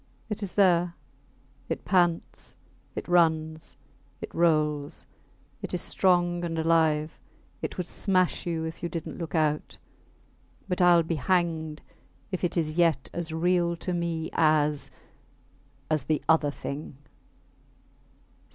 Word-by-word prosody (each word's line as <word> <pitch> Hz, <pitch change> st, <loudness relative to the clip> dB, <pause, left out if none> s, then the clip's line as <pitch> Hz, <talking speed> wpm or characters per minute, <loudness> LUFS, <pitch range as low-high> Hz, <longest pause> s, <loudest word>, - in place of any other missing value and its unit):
It 210 Hz, 0 st, -3 dB
is 200 Hz, -3 st, -4 dB
there; 175 Hz, -3 st, +4 dB, 0.7 s
it -, -, -3 dB
pants, 175 Hz, -3 st, 0 dB, 0.4 s
it -, -, -5 dB
runs, 160 Hz, -2 st, +1 dB, 0.4 s
it -, -, -7 dB
rolls; 150 Hz, -3 st, +1 dB, 0.6 s
it -, -, -3 dB
is -, -, -1 dB
strong 175 Hz, -2 st, +2 dB
and 165 Hz, -1 st, -2 dB
alive; 160 Hz, -1 st, +2 dB, 0.4 s
it -, -, -4 dB
would 180 Hz, -, -2 dB
smash 185 Hz, -1 st, +1 dB
you 165 Hz, -2 st, -1 dB
if 160 Hz, 0 st, -6 dB
you 170 Hz, -, -2 dB
didnt 165 Hz, -1 st, -5 dB
look 165 Hz, 0 st, -4 dB
out; 150 Hz, -1 st, 0 dB, 0.9 s
but 180 Hz, 0 st, -1 dB
Ill 175 Hz, -1 st, +6 dB
be 165 Hz, 0 st, -2 dB
hanged 160 Hz, -1 st, 0 dB, 0.5 s
if 185 Hz, -, -3 dB
it 175 Hz, -, 0 dB
is 155 Hz, -1 st, -1 dB
yet 165 Hz, -6 st, +2 dB
as 170 Hz, -1 st, -2 dB
real 170 Hz, +1 st, +1 dB
to 180 Hz, +2 st, -4 dB
me 170 Hz, -2 st, -2 dB
as... 150 Hz, -2 st, +2 dB, 1.0 s
as 155 Hz, -4 st, +1 dB
the 155 Hz, -1 st, 0 dB
other 160 Hz, -2 st, +4 dB
thing 140 Hz, 0 st, -6 dB
165 Hz, 130 wpm, -27 LUFS, 155-175 Hz, 1.0 s, Ill